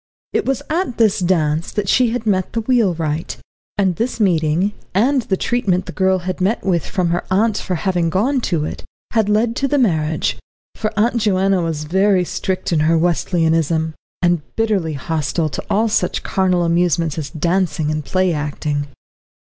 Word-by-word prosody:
It - - 0
was 270 -3 0
at 325 -5 -1
this 220 -4 +3
dance 165 -3 +1
that 210 -2 -2
she 250 +4 +3
had 235 0 -3
met 190 -4 0
the 230 - 0
wheelwright, 175 - 0 0.4
and 190 -4 +1
this 235 +1 -2
meeting, 175 0 +2 0.2
and 260 +7 +3
the 195 -4 -1
treatment 190 -7 0
the - - -6
girl 190 -1 +2
had 185 +1 -4
met 200 +5 0
with 175 -4 0
from 185 -4 0
her 175 +1 0
aunt 210 +3 +2
for 185 - -3
having 175 -1 0
gone 245 - +1
to 165 -8 -1
it, - - -6 0.3
had 220 -3 +1
led 225 +2 +2
to 275 - +1
the 290 - +1
marriage. 160 - +1 0.3
For 215 -1 -3
Aunt 235 +3 +2
Joanna 195 -3 +2
was 160 -3 -2
very 190 +3 +2
strict 185 0 -2
in 160 - +2
her 160 +2 +3
Wesleyanism, 165 -2 +1 0.3
and 175 -2 +3
bitterly 205 -8 0
hostile 155 +2 -1
to 140 - -5
all 220 +3 +2
such 195 -4 0
carnal 185 -2 +1
amusements 170 -2 +1
as 145 -3 -5
dancing 160 -1 0
and 155 0 -2
play 185 +2 +1
acting. 145 -1 -2
185 Hz, 175 wpm, -19 LUFS, 160-210 Hz, 0.4 s, this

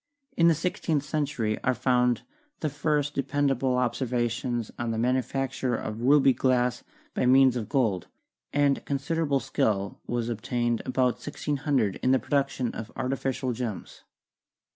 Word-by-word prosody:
In 170 - +5
the 165 - +5
sixteenth 160 -2 -1
century 140 -8 -2
are 130 -1 +2
found 125 -1 +2 0.4
the 155 - -1
first 145 0 0
dependable 135 -2 +1
ob 125 -2 +1
servations 120 -2 -2
on 120 -1 -2
the 115 - -1
manufacture 130 +1 0
of 110 0 -5
ruby 135 +1 +5
glass 125 -1 +1 0.3
by 125 - +1
means 130 0 +6
of 110 -3 -3
gold, 110 -10 +1 0.4
and 145 -1 +2
considerable 145 0 0
skill 100 -4 -1
was 120 -1 -1
attained 120 +1 -1
about 125 -1 +1
1600 140 -7 -1
in 130 - 0
the 130 - +5
production 135 -3 -1
of 115 0 -7
artificial 130 -1 -2
gems. 115 -4 -6
130 Hz, 140 wpm, -27 LUFS, 120-140 Hz, 0.4 s, means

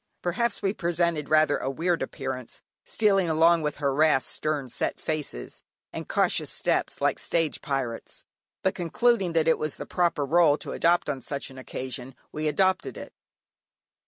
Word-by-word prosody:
Perhaps 210 +6 -1
we 195 0 +1
presented 170 -5 0
rather 155 -1 +4
a 135 - -2
weird 170 +5 0
appearance, 130 -4 -5 0.2
stealing 195 -5 +2
along 165 +1 +4
with 150 -1 -2
harassed, 145 0 +2
stern 150 -3 -2
set 120 - -3
faces, 150 - -4 0.3
and - - -6
cautious - - +2
steps, - - -1
like - - +1
stage 165 -2 0
pirates, 130 -5 -4 0.4
but 190 - +2
concluding 190 +1 +1
that 165 -1 +2
it 160 - +3
was 155 -2 -3
the - - -7
proper 170 -5 +1
rôle 155 0 +4
to - - -5
adopt 175 +1 +2
on 140 -3 -2
such 140 +1 -5
an 130 - -11
occasion 130 0 -6 0.2
we 155 0 -2
adopted 185 +5 +1
it. - - -9
155 Hz, 160 wpm, -26 LUFS, 140-175 Hz, 0.4 s, rather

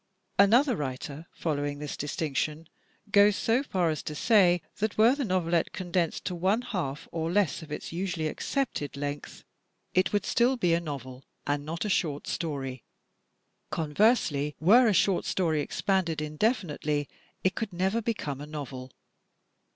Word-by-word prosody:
Another 240 +6 +5
writer, 145 +2 -5
following 145 -2 -2
this 150 0 -5
distinction, 150 +1 -2 0.4
goes 205 0 +6
so 230 +5 +2
far 185 - 0
as 155 - -3
to 150 - -6
say 180 -4 +4
that 215 0 -1
were 225 +4 +6
the 280 0 -2
novelette 175 -5 0
condensed 175 -2 -1
to - - -2
one 190 +7 +1
half 165 - -4
or 165 0 -2
less 200 -1 +1
of 160 -2 -11
its 150 - -5
usually 175 -2 -2
accepted 155 - -2
length 145 0 -5 0.5
it 185 -1 +2
would 205 -1 0
still 250 +2 +2
be 175 -7 +2
a 170 - +3
novel 135 -4 -7 0.2
and 145 0 -1
not 165 +5 -3
a - - 0
short 150 -6 0
story. 135 -6 -4 0.9
Conversely, 150 - +1
were 230 +10 +6
a - - +4
short 185 +1 +3
story 160 -5 0
expanded 175 0 0
indefinitely 150 - -1 0.4
it 185 - +2
could 220 -2 -3
never 190 +6 0
become 150 - -3
a 145 - -7
novel. 135 -4 -6
170 Hz, 150 wpm, -28 LUFS, 150-200 Hz, 0.9 s, goes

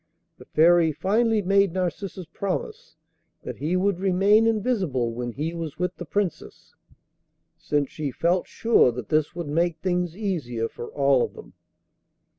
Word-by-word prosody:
The - - -13
Fairy 165 +1 +4
finally 215 +7 +1
made 195 -1 +3
Narcissus 185 0 -3
promise 460 - -4 0.5
that - - -6
he 155 +5 -1
would 190 -1 +1
remain 200 +4 +4
invisible 195 - 0
when 120 +1 -4
he 155 +6 -3
was 160 -3 -6
with 180 +1 -2
the 175 - -8
Princess, 200 -2 -4 0.8
since 145 -2 -1
she 150 -2 -3
felt 170 +7 0
sure 230 - +3
that 120 -3 -7
this 155 0 +1
would 170 -3 -5
make 165 +2 0
things 180 -1 -2
easier 140 - -2
for 120 - -8
all 140 -2 +2
of - - -2
them. - - -13
175 Hz, 150 wpm, -25 LUFS, 150-195 Hz, 0.8 s, Fairy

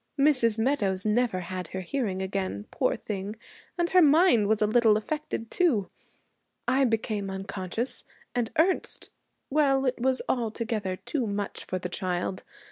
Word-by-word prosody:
Mrs. 255 -6 +4
Meadows 220 -6 +1
never 215 -3 +1
had 180 0 -5
her 190 - -5
hearing 190 -2 -2
again, 190 - -3
poor - - +1
thing, 200 0 -5 0.4
and 345 0 0
her 370 - +6
mind 300 - +5
was 215 0 +2
a 215 - +3
little 220 -1 +4
affected 260 -1 -4
too. 270 - +1 0.8
I 265 +2 +4
became 215 -4 -1
unconscious, 190 +4 -4 0.3
and 240 -2 0
Ernest 360 +4 +1 0.4
well, 275 -2 +3
it 255 -1 0
was 260 +1 +2
altogether 225 -4 -1
too 250 +5 -3
much 200 0 -3
for 185 - -2
the 180 - -4
child. 180 +1 -2
220 Hz, 145 wpm, -27 LUFS, 190-265 Hz, 0.8 s, her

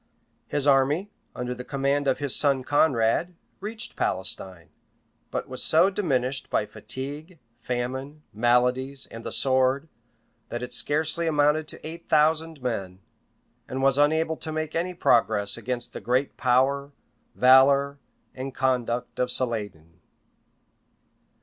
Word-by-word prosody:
] - - -43
His 145 -1 -1
army, 145 +8 +2 0.2
under 125 0 -3
the 125 0 -8
command 140 +1 -1
of 135 - +2
his 145 -2 -2
son 140 -3 +2
Conrade, 145 +4 +2 0.2
reached 220 +3 -6
Palestine; 95 -2 -3 0.6
but - - -4
was - - -5
so 175 +5 +4
diminished 135 -9 -1
by - - +1
fatigue 145 +6 -7 0.2
famine, 130 +5 -4
maladies, 125 +4 +1
and 115 0 -9
the - - -5
sword, 130 +2 +2 0.6
that 120 +1 -4
it 125 - -6
scarcely 160 +3 +2
amounted 150 0 +2
to - - -5
eight 165 +1 -10
thousand 155 -1 +2
men, 95 -7 -3 0.7
and 130 +1 -3
was 135 +1 +3
unable 160 +2 +2
to 160 - -5
make 155 0 -3
any 180 +2 -1
progress 105 -9 +2
against 125 -1 -5
the - - -7
great 130 +4 0
power, 135 +3 +1 0.4
valor, 140 +2 +5 0.3
and 130 0 -6
conduct 125 -2 -1
of 125 - +1
Saladin. 105 -10 -3
135 Hz, 130 wpm, -25 LUFS, 125-150 Hz, 0.7 s, valor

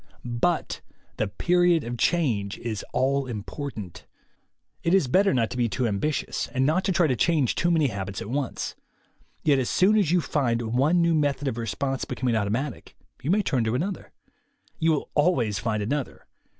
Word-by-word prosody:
But 120 +8 -1 0.4
the 110 - 0
period 175 - +2
of 120 +1 -4
change 115 - 0
is 110 -3 -4
all 135 +1 +1
important. 110 - -6 0.7
It 170 +3 +3
is 190 -9 +3
better 195 +10 +4
not 115 -4 +1
to 125 - -5
be 120 -2 +1
too 125 +2 0
ambitious, 120 +8 -1
and 130 +1 0
not 160 +6 +2
to 195 - +2
try 175 -1 +3
to 130 -5 +1
change 150 -2 +2
too 175 - +1
many 160 -5 +3
habits 95 -2 -5
at 115 - -6
once. 140 -1 -3 0.7
Yet 145 -3 +4
as 125 - -1
soon 200 +4 +4
as 190 -7 +2
you 180 +2 +4
find 130 -8 0
one 155 +8 +3
new 170 0 +3
method 145 -2 0
of 120 -3 -2
response 130 +5 -2
becoming 125 -3 -1
automatic, 115 +6 -2 0.3
you 140 - -4
may 205 +3 +3
turn 130 -9 +1
to 110 +2 0
another. 180 +6 -3 0.7
You 165 0 +3
will 150 - -3
always 130 - +2
find 110 -2 -1
another. 140 +5 -3
135 Hz, 180 wpm, -25 LUFS, 115-165 Hz, 0.7 s, better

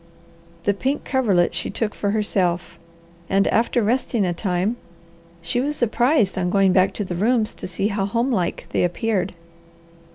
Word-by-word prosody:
The 205 - +2
pink 265 +8 -2
coverlet 210 -10 +2
she - - -3
took 220 -3 -2
for 205 - -2
herself, 190 -4 0 0.5
and 195 +1 +3
after 235 +1 +2
resting 235 -1 +1
a 175 - 0
time 185 +5 -1 0.7
she 240 +9 0
was 295 +3 -1
surprised 240 -3 +2
on 180 -1 0
going 195 0 +3
back 185 0 +4
to 205 - -2
the 185 - -4
rooms 215 +4 +1
to - - -7
see 190 +3 -1
how 200 -2 -1
homelike 230 -4 -1
they - - +1
appeared. 190 +1 -1
205 Hz, 160 wpm, -22 LUFS, 185-235 Hz, 0.7 s, back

